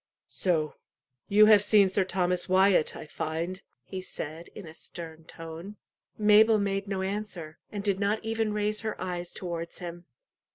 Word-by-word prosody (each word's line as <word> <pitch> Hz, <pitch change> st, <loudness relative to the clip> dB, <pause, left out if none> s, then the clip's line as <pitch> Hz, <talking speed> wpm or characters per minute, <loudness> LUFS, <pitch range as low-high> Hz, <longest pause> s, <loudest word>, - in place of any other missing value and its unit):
"So 160 Hz, -5 st, 0 dB, 0.5 s
you 210 Hz, +1 st, +7 dB
have 210 Hz, -2 st, +7 dB
seen 205 Hz, -2 st, +6 dB
Sir 190 Hz, +1 st, +1 dB
Thomas 180 Hz, -1 st, 0 dB
Wyat, 190 Hz, -3 st, +4 dB
I -, -, -8 dB
find," 165 Hz, +4 st, -4 dB, 0.2 s
he 190 Hz, -1 st, -6 dB
said, 165 Hz, -2 st, -7 dB
in 205 Hz, -, -8 dB
a 160 Hz, -, -10 dB
stern 160 Hz, -1 st, -7 dB
tone. 165 Hz, +6 st, -9 dB, 0.4 s
Mabel 215 Hz, +1 st, +6 dB
made 200 Hz, 0 st, -1 dB
no 195 Hz, -1 st, -2 dB
answer, 190 Hz, -5 st, -4 dB
and 205 Hz, -2 st, -4 dB
did 200 Hz, -2 st, +1 dB
not 205 Hz, +1 st, +2 dB
even 225 Hz, -1 st, 0 dB
raise 210 Hz, 0 st, 0 dB
her 220 Hz, -1 st, -4 dB
eyes 175 Hz, -1 st, -4 dB
towards 170 Hz, -2 st, -5 dB
him. 175 Hz, -1 st, -8 dB
190 Hz, 160 wpm, -28 LUFS, 170-205 Hz, 0.5 s, you